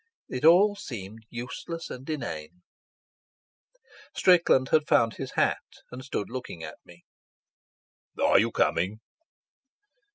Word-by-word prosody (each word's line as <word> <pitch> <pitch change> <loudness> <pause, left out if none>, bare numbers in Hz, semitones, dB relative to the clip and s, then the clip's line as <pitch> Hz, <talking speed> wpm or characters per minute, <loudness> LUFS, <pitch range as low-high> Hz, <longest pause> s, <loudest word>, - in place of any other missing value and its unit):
It 125 - -5
all 190 +6 +6
seemed 110 - -9
useless 125 +7 -6
and 130 +4 -9
inane. 90 - -5 1.5
Strickland 170 -8 +4
had 155 -2 +3
found 115 -1 +3
his - - -6
hat, - - +1 0.3
and 125 +1 -8
stood 130 -7 -3
looking 120 -9 -7
at 80 - -8
me. 85 0 -17 1.2
"Are - - +5
you - - +2
coming?" 95 +6 0
125 Hz, 110 wpm, -27 LUFS, 95-155 Hz, 1.5 s, all